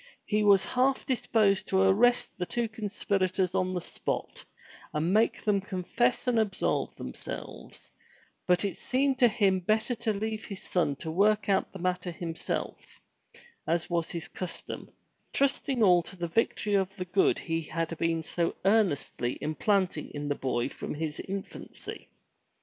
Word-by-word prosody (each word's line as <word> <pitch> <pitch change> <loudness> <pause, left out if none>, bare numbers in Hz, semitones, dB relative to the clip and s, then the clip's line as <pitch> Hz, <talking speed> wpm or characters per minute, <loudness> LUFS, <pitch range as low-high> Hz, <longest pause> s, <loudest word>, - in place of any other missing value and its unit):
He 210 0 +1
was 200 -2 +5
half 260 +2 +1
disposed 215 -6 +2
to 190 0 +3
arrest 230 +6 +4
the 180 - -3
two 240 -1 -1
conspirators 195 -4 -1
on 185 -1 +1
the 180 - -1
spot, - - -4 0.5
and 160 +5 +1
make 220 +2 +2
them 205 -2 +2
confess 200 +6 0
and 245 -2 +3
absolve 210 -3 0
themselves, - - -8 0.6
but 180 +2 +3
it 200 - -3
seemed 265 0 +1
to 245 - +7
him 200 -4 +2
better 215 +6 +1
to 230 -1 -1
leave 215 +1 -3
his 200 -2 -8
son 165 -6 +1
to 160 +3 -5
work 210 +4 +3
out 195 - +2
the - - -8
matter 180 0 -1
himself, 165 -1 -5 0.7
as 170 +1 0
was 170 -1 0
his 170 0 -4
custom, 180 -2 -6 0.4
trusting 270 -3 +2
all 180 -3 +6
to 180 - -10
the 175 -1 -3
victory 210 +2 0
of 195 -1 +1
the 185 -3 -4
good 180 +2 +3
he 165 -1 -2
had 165 +1 -3
been 165 -1 0
so 170 +1 -1
earnestly 190 - +1
implanting 180 0 0
in 145 0 -3
the - - +2
boy 130 -3 -1
from 140 - -6
his 155 0 -3
infancy. 195 0 -7
190 Hz, 155 wpm, -29 LUFS, 170-215 Hz, 0.7 s, to